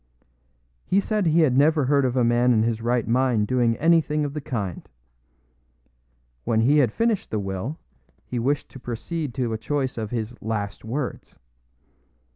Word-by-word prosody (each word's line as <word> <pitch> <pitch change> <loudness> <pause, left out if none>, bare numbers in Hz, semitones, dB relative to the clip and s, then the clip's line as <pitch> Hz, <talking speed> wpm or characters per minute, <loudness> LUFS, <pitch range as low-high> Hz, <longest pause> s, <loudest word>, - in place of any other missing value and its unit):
He 190 - +2
said 210 -2 0
he 165 +1 +4
had 135 -6 +3
never 150 +1 +4
heard 140 0 +3
of 125 0 -1
a 125 - +3
man 120 +1 +3
in 110 -1 +3
his 115 -1 -1
right 120 0 0
mind 120 -2 +2
doing 120 0 +1
anything 155 -2 +2
of 140 - -4
the 150 - -4
kind. 100 -10 -5 1.5
When 110 -1 +1
he 145 +6 +4
had 125 -6 +3
finished 225 - 0
the 110 - -2
will, 100 - -4 0.5
he 125 - -3
wished 140 +4 0
to 130 - -11
proceed 135 +6 -4
to 125 -4 -1
a 110 - -3
choice 130 +1 -2
of 110 -2 -4
his 115 0 -4
"last 105 -2 -4
words." 125 +4 -5
125 Hz, 170 wpm, -24 LUFS, 115-145 Hz, 1.5 s, he